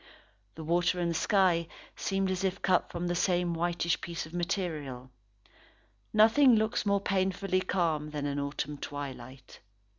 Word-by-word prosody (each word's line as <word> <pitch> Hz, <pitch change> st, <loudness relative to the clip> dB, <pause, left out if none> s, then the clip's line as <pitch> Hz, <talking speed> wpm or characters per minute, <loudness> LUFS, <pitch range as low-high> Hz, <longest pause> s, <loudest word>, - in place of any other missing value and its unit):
The 160 Hz, -, -7 dB
water 175 Hz, +2 st, +1 dB
and 170 Hz, -1 st, 0 dB
sky 180 Hz, -1 st, +2 dB, 0.3 s
seemed 195 Hz, -1 st, -1 dB
as 185 Hz, +1 st, -2 dB
if 190 Hz, -1 st, -2 dB
cut 185 Hz, -2 st, +2 dB
from 175 Hz, 0 st, -4 dB
the 175 Hz, -, 0 dB
same 175 Hz, 0 st, +1 dB
whitish 170 Hz, 0 st, 0 dB
piece 170 Hz, -1 st, -5 dB
of 160 Hz, -, -13 dB
material. 155 Hz, -8 st, -3 dB, 1.0 s
Nothing 225 Hz, +4 st, +6 dB
looks 220 Hz, 0 st, 0 dB
more 200 Hz, 0 st, +3 dB
painfully 190 Hz, -1 st, 0 dB
calm 160 Hz, -5 st, 0 dB
than 150 Hz, -1 st, -4 dB
an 145 Hz, 0 st, -2 dB
autumn 140 Hz, +1 st, -4 dB
twilight. 135 Hz, -3 st, -8 dB
175 Hz, 145 wpm, -30 LUFS, 150-190 Hz, 1.0 s, Nothing